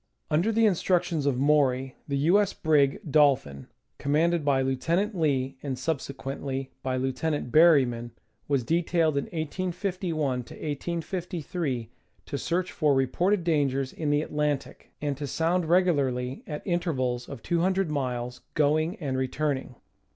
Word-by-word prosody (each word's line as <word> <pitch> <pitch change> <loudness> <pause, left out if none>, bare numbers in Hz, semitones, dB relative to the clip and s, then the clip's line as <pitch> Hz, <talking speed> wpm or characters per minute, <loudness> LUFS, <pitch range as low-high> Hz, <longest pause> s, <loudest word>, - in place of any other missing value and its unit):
Under 170 +9 +2
the 225 +1 +3
instructions 175 -6 +1
of 135 -3 +1
Maury 135 -2 +2
the 140 -1 -1
U. 170 +8 +4
S. 200 - -1
brig 145 -4 +2
Dolphin, 135 - +2 0.3
com 140 - -1
manded 170 +1 +2
by 135 -2 +2
Lieutenant 165 - 0
Lee, 135 -5 0
and 135 -3 -3
subsequently 135 -2 -4
by 130 -1 -1
Lieutenant 130 +1 -2
Berry 155 -4 +7
man, 120 -1 -5 0.4
was 140 -3 +1
detailed 165 +1 +1
in 140 - 0
1851 170 -4 -2 0.6
3 165 - -3 0.4
to 140 - -4
search 180 +1 -1
for 150 -3 +2
reported 175 +9 +1
dangers 140 -5 +1
in 155 -2 -2
the 145 +1 +2
Atlantic, 150 -2 -2
and 145 -1 0
to 145 0 -4
sound 165 +5 +1
regularly 140 -8 +1
at 150 -1 -6
intervals 130 -9 -1
of - - -8
200 180 0 +1
miles 125 -3 -3
going 155 +4 +2
and 140 -9 -3
returning. 135 -1 -2
150 Hz, 135 wpm, -27 LUFS, 135-170 Hz, 0.6 s, Berry